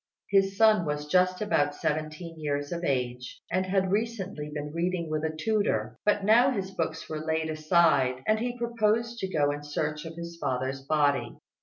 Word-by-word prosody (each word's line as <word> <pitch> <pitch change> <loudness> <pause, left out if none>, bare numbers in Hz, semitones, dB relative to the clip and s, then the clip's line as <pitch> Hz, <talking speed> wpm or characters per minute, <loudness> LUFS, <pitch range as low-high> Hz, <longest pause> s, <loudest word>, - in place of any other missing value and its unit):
His 195 0 +3
son 215 -4 +5
was 150 -1 -2
just 185 +4 +2
about 145 -8 +1
seventeen 155 +3 -3
years 145 -1 -2
of 170 0 -3
age, 125 -4 -2
and 185 +1 0
had 190 0 +1
recently 200 -8 -2
been 150 0 -5
reading 170 -1 -1
with 155 0 -1
a 160 - +1
tutor; 155 - 0
but 205 -1 +2
now 235 +5 +6
his 195 -7 -3
books 160 -3 -3
were 155 - -4
laid 160 0 -1
aside, 155 -5 +3
and 215 0 +2
he 245 +1 -3
proposed 235 0 0
to 190 - -2
go 145 -3 +2
in 145 0 -5
search 150 +1 -3
of 165 0 -7
his 170 0 -7
father's 130 +1 -2
body. 145 0 +1
160 Hz, 180 wpm, -28 LUFS, 150-195 Hz, -, now